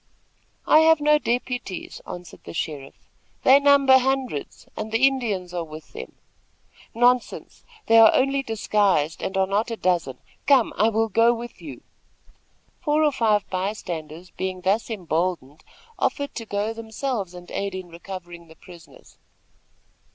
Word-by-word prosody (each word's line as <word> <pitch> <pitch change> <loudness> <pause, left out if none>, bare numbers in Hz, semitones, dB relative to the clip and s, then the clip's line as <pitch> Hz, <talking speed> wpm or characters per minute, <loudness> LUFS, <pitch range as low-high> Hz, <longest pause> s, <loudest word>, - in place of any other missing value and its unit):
"I 310 - +6
have 320 0 +5
no 300 0 +4
deputies," 245 -6 -4
answered 175 -2 -10
the - - -9
sheriff. 145 -4 -6 0.4
"They 265 +2 +7
number 280 -2 +5
hundreds, 260 - -3
and 215 0 -5
the 225 +4 +3
Indians 215 -10 -1
are 175 -1 -2
with 155 -1 -12
them." - - -8 0.8
"Nonsense! 245 +1 0 0.2
They 225 0 +6
are 220 -1 +8
only 275 +1 +1
disguised, 205 - 0
and 190 - -3
are 190 - +3
not 205 +4 -1
a 230 - -3
dozen. 170 -10 0 0.3
Come! 270 -5 +4
I 220 - +3
will 225 0 +1
go 230 +3 +3
with 235 +1 -9
you." - - -10 1.0
Four 305 -2 +1
or 300 - +3
five 215 -6 +1
by 190 +2 -1
standers, 170 -3 -8
being 185 -1 -4
thus 200 +6 0
emboldened, 170 - -3 0.4
offered 285 0 -1
to 230 - -7
go 205 +2 -2
themselves 220 -4 -4
and 175 0 -12
aid 200 -1 -3
in 185 -2 -7
recovering 175 -1 -10
the 160 - -16
prisoners. 175 -1 -17
210 Hz, 150 wpm, -23 LUFS, 180-250 Hz, 1.0 s, are